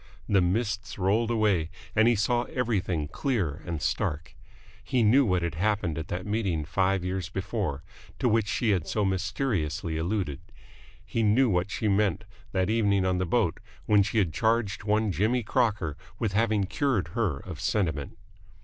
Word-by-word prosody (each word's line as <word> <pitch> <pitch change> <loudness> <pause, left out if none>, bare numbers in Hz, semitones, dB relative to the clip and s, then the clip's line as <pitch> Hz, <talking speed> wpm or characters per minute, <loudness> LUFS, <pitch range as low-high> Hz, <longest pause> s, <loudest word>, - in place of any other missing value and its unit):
The 100 -2 +4
mists 105 +3 -1
rolled 105 +4 +1
away 105 -8 +2 0.3
and 110 +1 +5
he 120 - +4
saw 120 +4 +1
everything 95 - -1
clear 90 - -2
and 85 -3 -3
stark. 80 +5 -2 0.5
He 125 -2 +1
knew 125 +6 +5
what 90 -2 +1
had 85 - -2
happened 90 -1 0
at 80 - -5
that 90 +1 -4
meeting 100 -8 -1
five 95 +3 +1
years 90 -1 -3
before, 95 - -3 0.3
to 130 - +1
which 110 -2 +2
she 110 +1 +1
had 90 -5 0
so 105 -2 0
mysteriously 95 - -1
alluded. 85 -4 -2 0.7
He 115 - -1
knew 115 +3 +4
what 90 +2 +1
she 110 - -3
had 105 - +3
meant 105 -1 +1 0.3
that 95 -1 +1
evening 100 -3 +2
on 90 -1 +1
the 90 - -1
boat, 100 -3 +1 0.3
when 105 -1 +5
she 110 +4 -1
had 90 -7 +2
charged 110 -3 0
one 110 0 +2
Jimmy 115 +6 +1
Crocker 105 -8 0 0.2
with 105 -3 -1
having 110 -1 +2
cured 100 - 0
her 90 - -1
of - - -8
sentiment. 80 -9 -1
100 Hz, 170 wpm, -27 LUFS, 90-110 Hz, 0.7 s, and